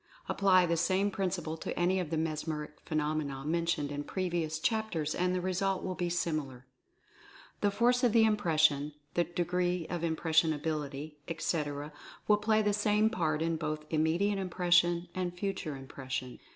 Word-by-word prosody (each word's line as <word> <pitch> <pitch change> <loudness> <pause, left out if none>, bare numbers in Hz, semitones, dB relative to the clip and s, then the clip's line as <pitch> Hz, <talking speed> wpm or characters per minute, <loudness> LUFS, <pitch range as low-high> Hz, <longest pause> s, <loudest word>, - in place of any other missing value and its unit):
Apply 185 -2 +4
the 170 -1 +1
same 190 +4 +2
principle 180 -4 -2
to - - -5
any 180 +2 +2
of 175 -4 -3
the 160 - -1
mesmeric 155 -1 -3
phenomena 150 -3 -2
mentioned 165 -2 0
in 145 0 -3
previous 170 -3 -2
chapters 175 -6 -1
and 180 0 0
the 180 - -1
result 185 +1 0
will 185 - -2
be 175 -1 -2
similar. 155 -7 -2 0.9
The 205 - +2
force 240 +5 +2
of 245 - +5
the 225 0 +5
impression, 155 -8 +2 0.2
the 175 - +2
degree 175 +1 -1
of 175 -2 -2
impressionability, 155 -3 0
etc., 150 -3 -2 0.3
will 210 - +5
play 215 +1 +2
the 205 0 +2
same 210 +1 +2
part 155 -3 0
in 165 0 0
both 155 -1 -3
Immediate 170 +6 +1
Impression 175 -1 +2
and 180 -1 -3
Future 185 -6 -3
Impression. 130 -1 -6
170 Hz, 150 wpm, -31 LUFS, 155-185 Hz, 0.9 s, of